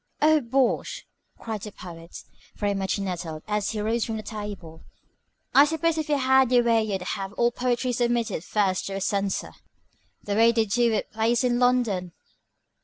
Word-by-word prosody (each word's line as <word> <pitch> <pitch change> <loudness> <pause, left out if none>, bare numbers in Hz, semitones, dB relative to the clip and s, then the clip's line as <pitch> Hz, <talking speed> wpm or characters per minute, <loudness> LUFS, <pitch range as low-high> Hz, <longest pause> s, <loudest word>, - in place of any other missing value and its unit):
"Oh, 310 0 +4
bosh!" 260 +1 0 0.3
cried 220 -3 -5
the 210 - -7
Poet, 170 -3 -10 0.3
very 205 -1 -1
much 195 0 -1
nettled, 175 -5 -4
as 210 -1 -1
he 220 - -3
rose 225 +2 0
from 225 -1 -3
the 215 - -6
table. 205 -7 -7 0.7
"I 280 - +8
suppose 320 +2 0
if 310 - -4
you 295 - +3
had 265 -1 +3
your 245 -1 +5
way 230 -1 +3
you'd 195 -4 -3
have 195 +1 -4
all 235 +2 +2
poetry 250 +1 -1
submitted 235 -7 0
first 195 -3 0
to 195 - -5
a 195 - -3
censor, 200 0 -1 0.7
the 205 - -3
way 230 +2 +5
they 225 -1 +2
do 235 +3 +2
with 220 - -2
plays 225 +3 +1
in 245 -1 +1
London." 230 -8 +1
220 Hz, 180 wpm, -25 LUFS, 195-245 Hz, 0.7 s, I